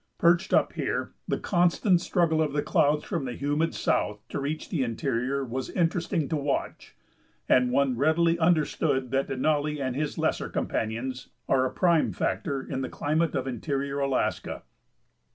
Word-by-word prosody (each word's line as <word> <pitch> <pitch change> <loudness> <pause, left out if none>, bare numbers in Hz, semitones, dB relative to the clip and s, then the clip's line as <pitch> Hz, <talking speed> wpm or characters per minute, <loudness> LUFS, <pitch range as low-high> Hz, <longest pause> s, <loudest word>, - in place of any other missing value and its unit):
Perched 175 +3 +3
up - - +3
here, - - -2
the - - 0
constant 175 0 +2
struggle 170 -4 +1
of 150 -3 0
the 145 - 0
clouds 150 +1 +2
from 170 -9 -3
the 125 - -4
humid 145 +4 0
south 105 0 -1
to - - -3
reach 150 +3 -3
the 165 -7 -1
interior 125 +3 -1
was 130 +2 -4
interesting 170 -2 0
to - - 0
watch, 140 -1 -3 0.5
and 125 -1 +4
one 135 -1 +2
readily 165 +5 +2
understood 155 -5 +1
that 135 0 +1
Denali 150 +2 0
and 130 -2 -2
his 150 +1 -2
lesser - - 0
companions 120 +4 -3 0.2
are 130 -1 +3
a - - -6
prime 170 -4 +2
factor 140 -4 -2
in 130 - -4
the 130 - -3
climate 155 +2 0
of 130 -2 -1
interior 140 +2 -2
Alaska. 135 -2 -1
145 Hz, 160 wpm, -27 LUFS, 130-165 Hz, 0.5 s, and